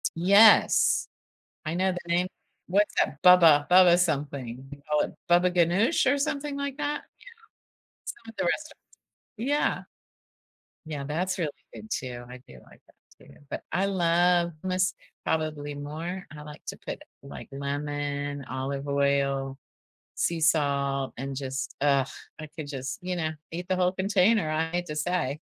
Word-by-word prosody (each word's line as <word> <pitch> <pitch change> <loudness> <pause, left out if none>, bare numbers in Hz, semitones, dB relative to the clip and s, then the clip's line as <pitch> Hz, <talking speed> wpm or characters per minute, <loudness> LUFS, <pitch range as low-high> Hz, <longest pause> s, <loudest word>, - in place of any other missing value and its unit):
Yes. 200 +6 +6 0.6
I 160 +2 -2
know 190 +1 +2
the 180 - -5 0.2
name 180 +1 +2 0.4
what's 205 +3 +2
that? 145 - 0
Baba 165 -5 +7
baba-something, 145 -8 +3
you 145 0 -10
call 150 0 +3
it - - -15
baba 175 +1 +4
ganoush, 185 - +3
or 285 - +2
something 285 0 -2
like 280 0 -4
that? 295 0 -2 0.2
Yeah. - - -19 0.8
Some 230 -1 -8
of 225 - -12
the - - 0
restaurants 310 - -2 0.6
Yeah. 285 +6 0 1.0
Yeah, 150 -3 -5
that's 180 +6 -2
really 155 -4 -1 0.2
good, 220 - -10
too, 120 -2 -4
I 125 0 -9
do 65 - -13
like - - -19
that, - - -24
too, - - -17
but - - -4
I 185 +4 +1
love 175 -2 +2
hummus, 185 0 +1 0.3
probably 155 -2 -2
more. 160 +6 -6
I 150 - -9
like 150 0 -11
to - - -5
put, - - -6 0.2
like, 140 - -10
lemon, 145 0 -3
olive 135 +2 -4
oil, 140 -1 +1 0.6
sea 170 -1 0
salt, 140 -3 +1
and, 135 +1 -4
just 135 +2 -4
ugh, 140 -2 +3 0.3
I 155 - -7
could 155 -3 -6
just 135 -2 -5
you 180 -1 -2
know? 160 -1 -1 0.2
Eat 175 +2 -5
the 185 - +1
whole 180 0 +2
container, 195 -1 +2
I 160 +1 0
hate 175 0 -2
to 150 - -5
say. 155 -3 -1
160 Hz, 155 wpm, -27 LUFS, 140-185 Hz, 1.0 s, Baba